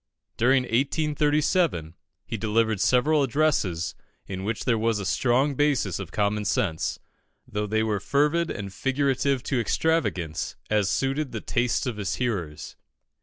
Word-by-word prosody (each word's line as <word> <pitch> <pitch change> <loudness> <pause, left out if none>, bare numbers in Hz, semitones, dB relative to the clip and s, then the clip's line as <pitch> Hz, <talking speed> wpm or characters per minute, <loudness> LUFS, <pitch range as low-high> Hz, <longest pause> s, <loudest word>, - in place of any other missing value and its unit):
During 130 +2 +3
1837, 145 - +1 0.3
he - - -4
delivered 110 -1 +1
several 145 +5 +3
addresses 125 - +1 0.3
in 95 -1 -5
which 110 +2 -3
there 120 - +3
was 115 0 +1
a 100 - -4
strong 130 +8 +2
basis 135 - +1
of 95 -5 -7
common 105 0 0
sense, 100 -7 0 0.5
though 105 0 -2
they 110 +1 +1
were 105 -2 0
fervid 150 +7 +1
and 100 -2 -5
figurative 135 +3 0
to 135 -3 0
extravagance, 115 - 0 0.2
as 105 -3 +2
suited 135 +1 -1
the 110 - -2
tastes 120 0 0
of 120 -4 -3
his 100 -2 -2
hearers. 95 -12 -3
115 Hz, 140 wpm, -26 LUFS, 100-140 Hz, 0.5 s, During